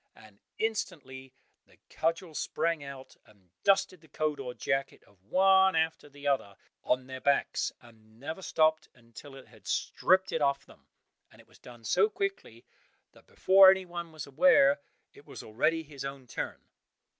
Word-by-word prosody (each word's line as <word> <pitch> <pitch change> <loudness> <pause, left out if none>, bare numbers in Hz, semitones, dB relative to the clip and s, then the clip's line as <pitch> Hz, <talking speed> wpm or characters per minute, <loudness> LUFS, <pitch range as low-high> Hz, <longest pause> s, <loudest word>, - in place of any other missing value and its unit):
and 110 -2 -18 0.2
instantly 150 - -4 0.4
the - - -24
cudgel 165 +1 -2
sprang 160 0 -2
out, 135 -1 -10
and 95 -5 -25
dusted 195 -3 +2
the 160 - -20
coat 150 0 -2
or 125 -2 -6
jacket 135 0 -2
of 100 -3 -27
one 190 - +4
after 160 -2 -1
the 145 0 -14
other 130 -8 0 0.3
on 125 0 0
their 130 0 -8
backs, 140 0 +1
and 110 -2 -20
never 160 +7 -6
stopped 155 -3 +1
until 120 +3 -14
it 135 - -13
had 110 -5 -19
stripped 185 - +1
it 160 - -2
off 140 -1 0
them, - - -20 0.4
and - - -21
it - - -19
was - - -22
done 120 -2 -14
so 425 - +2
quickly, 395 -1 -5 0.5
that - - -22
before 190 0 +6
anyone 175 -3 -1
was 155 -4 -8
aware, 275 - +4 0.3
it 425 - -18
was - - -10
already 155 +9 0
his 145 -3 -10
own 135 -1 -7
turn. 120 - -6
145 Hz, 165 wpm, -29 LUFS, 130-180 Hz, 0.5 s, before